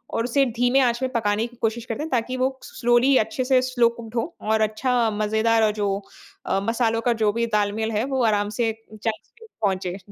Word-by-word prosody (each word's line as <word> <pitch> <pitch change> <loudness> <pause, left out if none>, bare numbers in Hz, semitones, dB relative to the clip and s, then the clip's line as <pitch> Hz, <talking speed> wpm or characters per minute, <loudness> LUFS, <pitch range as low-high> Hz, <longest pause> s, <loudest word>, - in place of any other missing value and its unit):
और 230 - +1
उसे 270 +3 +2
धीमे 245 +2 +3
आँच 240 0 +1
में 255 - -1
पकाने 215 -1 +1
की 240 - -18
कोशिश 225 +1 -1
करते 235 +6 -4
हैं 320 - -5
ताकि 255 +1 -1
वो 260 +1 +2
स्लोली 240 +2 +2
अच्छे 220 +4 0
से 255 -1 +4
स्लो 250 -2 +2
कुक्ड 225 0 -9
हो 305 +9 -2 0.2
और 220 - +2
अच्छा 230 +2 +1
मज़ेदार 220 +2 +1
और 215 - +3
जो 200 - +1 0.6
अ, 195 - +1
मसालों 230 0 0
का 240 0 +2
जो 210 - +4
भी 235 +1 0
तालमेल 210 +2 -1
है 215 +1 0
वो 255 - +1
आराम 205 -2 +1
से 225 -1 +2 0.2
चंक्स 215 +1 -5
में 455 - -13
पहुँचे 190 -3 -1
230 Hz, 215 wpm, -23 LUFS, 215-245 Hz, 0.6 s, से